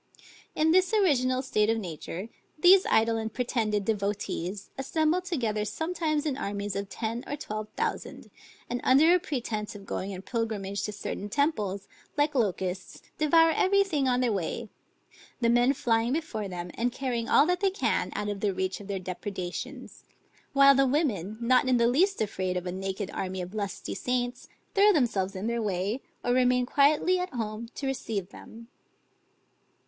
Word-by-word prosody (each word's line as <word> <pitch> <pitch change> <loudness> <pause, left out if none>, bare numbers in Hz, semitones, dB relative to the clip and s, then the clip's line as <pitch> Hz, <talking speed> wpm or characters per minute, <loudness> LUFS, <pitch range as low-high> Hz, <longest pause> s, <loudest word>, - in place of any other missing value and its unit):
In 315 +1 +3
this 370 +4 +3
original 260 - +2
state 215 -5 +1
of 225 - +2
nature, 180 +1 -6 0.3
these 365 +4 +6
idle 225 +1 +3
and 220 0 -3
pretended 220 -5 -1
devotees, 200 -2 -2
assemble 315 +5 +1
together 240 - -1
sometimes 310 - -1
in 290 -4 0
armies 200 -5 -3
of 200 0 -3
ten 230 +4 -4
or 290 - -2
twelve 215 -7 -5
thousand, - - -3 0.4
and 245 +1 -3
under 295 +7 +6
a 360 - +4
pretence 235 - -4
of 200 -1 -10
going 195 0 -4
in 190 -1 -7
pilgrimage 205 -5 -2
to 210 - -3
certain 205 0 -5
temples, 210 - 0 0.3
like 295 +1 +2
locusts 190 -6 -2 0.2
devour 325 +2 +5
every 395 +4 +3
thing 300 -9 0
on 250 0 +2
their 245 -2 +2
way; 205 +4 -3 0.7
the 235 -2 +3
men 240 +2 +4
flying 235 -2 +1
before 265 -10 -3
them, 175 -1 -6
and 245 +2 -1
carrying 245 -2 -3
all 290 - +6
that 360 +1 +1
they 390 - +3
can 390 +3 0
out 210 0 -2
of 205 -1 -3
the 200 -2 0
reach 190 0 -2
of 200 - -11
their 200 -1 -2
depredations; 190 +7 -6 0.5
while 275 0 +7
the 270 0 +3
women, 220 - 0
not 250 +2 +3
in 255 -1 +4
the 235 - +3
least 355 +12 +3
afraid 185 -3 -2
of 180 - -4
a 180 - -2
naked 190 +1 -4
army 190 0 -4
of 180 +2 -6
lusty 200 -3 -4
saints, 245 0 -2 0.3
throw 405 +1 +6
themselves 210 - +1
in 190 +2 -4
their 235 0 -1
way, 205 +4 -1 0.2
or 245 - +1
remain 250 0 +3
quietly 295 +8 +3
at 360 - -3
home 220 0 -4
to 280 - -5
receive 220 -8 -3
them. 230 +2 -12
235 Hz, 175 wpm, -28 LUFS, 200-280 Hz, 0.7 s, while